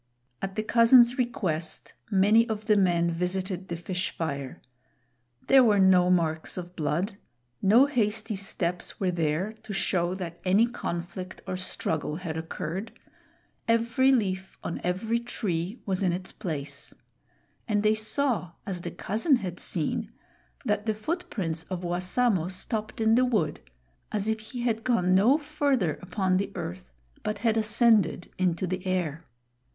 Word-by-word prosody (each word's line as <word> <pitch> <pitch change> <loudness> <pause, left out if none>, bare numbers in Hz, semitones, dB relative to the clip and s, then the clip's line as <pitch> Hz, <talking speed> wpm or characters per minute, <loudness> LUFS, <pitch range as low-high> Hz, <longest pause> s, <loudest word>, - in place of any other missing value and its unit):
At 195 0 -4
the 215 - -1
cousin's 235 +2 +6
request, 180 -10 -2 0.2
many 215 +4 +4
of 215 -1 -3
the 210 - +4
men 175 -3 +3
visited 185 +2 -2
the 170 - -3
fish 180 +2 -3
fire. 140 -5 -4 0.9
There 270 -1 +7
were 215 -4 +4
no 185 -2 +5
marks 165 -2 +1
of 180 0 -7
blood. 175 +6 -1 0.4
No 225 +7 +6
hasty 225 -5 0
steps 180 -2 -3
were 185 -2 +1
there 170 +4 -1
to 210 - -7
show 180 -2 +1
that 175 -3 -6
any 195 +5 +4
conflict 185 -5 -5
or 185 - -3
struggle 160 -4 -2
had 165 -2 -5
occurred. 165 +5 -5 0.7
Every 230 +3 +3
leaf 190 -6 0
on 165 - -4
every 210 +6 0
tree 200 -3 -3
was 190 -2 -1
in 180 -3 +2
its 185 +1 -4
place; 145 -7 -5 0.7
and 210 -2 +1
they 215 0 +4
saw, 215 - 0
as 180 -3 -4
the - - -4
cousin 225 - +1
had 185 -6 -4
seen, - - -2 0.5
that 210 -1 0
the 220 - +1
foot 330 +12 -3
prints 165 -6 -2
of 185 -1 -5
Wassamo 180 +2 +1
stopped 215 +4 -3
in 220 0 +4
the 250 +2 +5
wood, 210 -12 0 0.5
as 210 -1 -1
if 220 0 0
he 220 +3 -7
had 225 -2 0
gone 185 -8 +2
no 220 +10 +5
farther 285 - 0
upon 185 0 0
the 200 - -2
earth 85 -7 -6 0.3
but 210 - -2
had 225 -1 +4
ascended 220 -5 +3
into 185 0 +1
the 185 0 -3
air. 165 -4 -2
190 Hz, 150 wpm, -27 LUFS, 175-225 Hz, 0.9 s, There